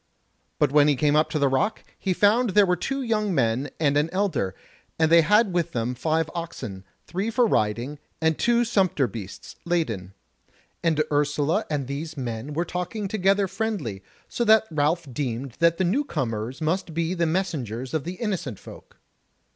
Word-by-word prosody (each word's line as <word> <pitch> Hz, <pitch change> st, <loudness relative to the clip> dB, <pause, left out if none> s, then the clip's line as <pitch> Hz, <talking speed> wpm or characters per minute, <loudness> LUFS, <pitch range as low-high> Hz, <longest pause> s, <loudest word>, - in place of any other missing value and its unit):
But 145 Hz, -3 st, +2 dB
when 145 Hz, 0 st, +5 dB
he 145 Hz, -, +4 dB
came 145 Hz, +2 st, +2 dB
up 155 Hz, +1 st, +3 dB
to -, -, -1 dB
the 140 Hz, -2 st, +3 dB
rock, 200 Hz, +12 st, 0 dB, 0.2 s
he 190 Hz, -, -1 dB
found 215 Hz, +6 st, +3 dB
there 195 Hz, -4 st, +5 dB
two 270 Hz, +10 st, -3 dB
young 215 Hz, -5 st, 0 dB
men 125 Hz, +2 st, +1 dB
and 145 Hz, -3 st, +2 dB
an 150 Hz, +2 st, +2 dB
elder, 180 Hz, -, -1 dB, 0.4 s
and 160 Hz, 0 st, +2 dB
they 170 Hz, 0 st, +8 dB
had 210 Hz, +3 st, +3 dB
with 170 Hz, -1 st, 0 dB
them 120 Hz, +1 st, -1 dB
five 155 Hz, +5 st, 0 dB
oxen, 110 Hz, -, -6 dB, 0.2 s
three 195 Hz, +5 st, -2 dB
for 240 Hz, +2 st, +3 dB
riding, 120 Hz, -, 0 dB, 0.2 s
and 160 Hz, 0 st, +2 dB
two 240 Hz, +5 st, +2 dB
sumpter 190 Hz, -, +2 dB
beasts, 100 Hz, -3 st, -8 dB
laden: 115 Hz, -, -2 dB, 0.7 s
and 160 Hz, -3 st, +2 dB
Ursula 150 Hz, +6 st, +1 dB
and 145 Hz, -3 st, -1 dB
these 150 Hz, +4 st, -5 dB
men 120 Hz, +2 st, -4 dB
were 170 Hz, +4 st, -1 dB
talking 180 Hz, +4 st, -3 dB
together 195 Hz, 0 st, +2 dB
friendly; 180 Hz, -, -3 dB, 0.3 s
so 240 Hz, -, -2 dB
that 220 Hz, -1 st, +5 dB
Ralph 155 Hz, +3 st, +1 dB
deemed 130 Hz, -1 st, -3 dB
that 170 Hz, 0 st, +4 dB
the 190 Hz, -, +1 dB
new 215 Hz, +12 st, +1 dB
comers 125 Hz, -, -3 dB
must 165 Hz, +1 st, -1 dB
be 170 Hz, +1 st, 0 dB
the 170 Hz, -2 st, 0 dB
messengers 135 Hz, -, -2 dB
of 155 Hz, -3 st, 0 dB
the 175 Hz, -, -4 dB
Innocent 185 Hz, -, -3 dB
Folk. -, -, -14 dB
160 Hz, 175 wpm, -25 LUFS, 135-190 Hz, 0.7 s, they